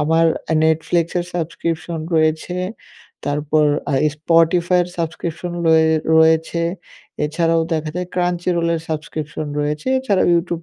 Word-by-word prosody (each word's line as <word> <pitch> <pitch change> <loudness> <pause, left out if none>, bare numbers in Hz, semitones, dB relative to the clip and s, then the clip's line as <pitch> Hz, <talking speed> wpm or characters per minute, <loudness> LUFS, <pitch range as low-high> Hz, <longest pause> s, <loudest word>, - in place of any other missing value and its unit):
আমার 165 +2 +3 0.4
Netflix 160 +1 +1
এর 175 - -2
subscription 165 0 -3 0.2
রয়েছে, 160 +2 +1 0.7
তারপর 150 +1 +1 0.2
আ - - 0 0.2
Spotify 170 +3 +3
এর 175 - -6
সাবস্ক্রিপশন 170 +1 -4
রয়ে 160 0 +5 0.3
রয়েছে, 160 +1 +3 0.6
এছাড়াও 165 +2 +1
দেখা 155 -1 -1
যায় 180 0 -2
Crunchyroll 175 -1 0
এর 160 - -2
সাবস্ক্রিপশন 150 -1 -4
রয়েছে, 150 +4 -3
এছাড়াও 210 -8 +1
YouTube 170 -1 -1
165 Hz, 120 wpm, -19 LUFS, 155-170 Hz, 0.7 s, রয়ে